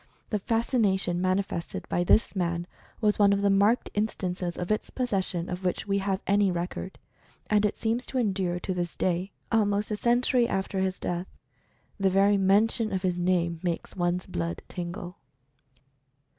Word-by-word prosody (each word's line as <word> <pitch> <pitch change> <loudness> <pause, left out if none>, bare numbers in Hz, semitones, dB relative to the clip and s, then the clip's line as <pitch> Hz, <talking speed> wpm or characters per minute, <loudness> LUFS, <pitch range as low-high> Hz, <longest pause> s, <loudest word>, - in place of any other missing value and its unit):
The 210 - +1
fascination 200 -5 +1
manifested 185 -2 -1
by 175 - 0
this 210 +4 +3
man 170 -2 -1 0.4
was 210 -1 +2
one 200 -1 +6
of 200 0 0
the 200 - +4
marked 205 +5 +3
in 210 +1 +2
stances 180 -3 -4
of 180 +3 -3
its 215 - -1
possession 190 -8 -1
of 180 +1 -5
which 180 - -1
we 200 0 +1
have 195 0 -1
any 200 0 +3
record. 180 +2 -4 0.5
And 210 0 +4
it - - -5
seems 230 +2 -1
to 265 - -3
endure 190 -6 0
to 185 - -2
this 175 -1 -3
day 185 +2 0
— - - -38
almost 210 -1 +1
a - - +1
century 240 +2 +3
after 195 -1 -2
his 190 0 -1
death. 175 +1 -3 0.7
The 195 -1 +3
very 200 +2 +4
mention 210 +3 +3
of 190 -1 -2
his 180 -1 0
name 175 -2 +1
makes 175 -2 -3
one's 175 0 0
blood 85 -1 -4
tingle. 175 0 -6
190 Hz, 170 wpm, -27 LUFS, 180-210 Hz, 0.7 s, one